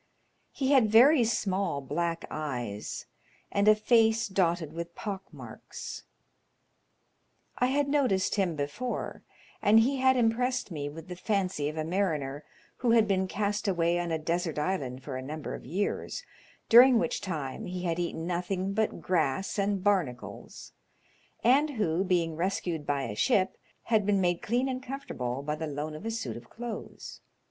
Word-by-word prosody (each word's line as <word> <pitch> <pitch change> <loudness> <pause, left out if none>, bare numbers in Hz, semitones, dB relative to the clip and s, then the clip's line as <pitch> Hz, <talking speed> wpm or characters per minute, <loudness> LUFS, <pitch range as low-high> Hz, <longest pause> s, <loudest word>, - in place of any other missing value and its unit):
He 270 -1 -1
had 255 -6 +5
very 250 +4 +7
small 195 -8 0
black 165 +5 -2
eyes, 120 -9 -4 0.5
and 200 +1 +2
a 215 - +8
face 225 0 +3
dotted 175 -5 0
with 170 0 -6
pock 195 -3 -6
marks. - - -9 1.5
I 250 - +3
had 280 +2 +1
noticed 260 -10 +2
him 190 -5 +1
before, 150 - -4 0.4
and 220 +2 +6
he 270 +4 +1
had 260 0 +4
impressed 245 0 +1
me 145 -3 -3
with 160 +2 -10
the 180 - -6
fancy 185 -6 -1
of 155 - -7
a 155 - 0
mariner 155 -5 -1 0.3
who 245 - 0
had 225 -2 +5
been 190 -1 +1
cast 205 +2 -1
away 175 -2 +2
on 175 -1 -2
a 160 - +1
desert 165 0 -2
island 140 -6 -2
for 135 -3 -5
a - - -4
number 150 +2 -5
of - - -8
years, 190 +8 -2 0.4
during 245 +2 +8
which - - 0
time 150 -8 -4
he 180 0 -4
had 170 -1 -1
eaten 170 -1 -3
nothing 180 +2 -2
but 220 +1 -1
grass 180 +2 0
and 200 -1 0
barnacles, 175 -12 -2 0.7
and 275 +6 +4
who, 175 -3 +1
being 175 -4 +1
rescued 170 -3 -2
by 140 -1 0
a 105 - -4
ship, 190 - +2 0.3
had 215 -3 +1
been 200 -1 +3
made 175 -2 +1
clean 245 +4 0
and 255 -1 -3
comfortable 140 - -4
by 150 +1 -2
the 160 +1 -4
loan 150 +1 -4
of 155 +9 -7
a - - 0
suit 225 0 -4
of - - -13
clothes. 235 -1 -7
185 Hz, 165 wpm, -29 LUFS, 155-220 Hz, 1.5 s, a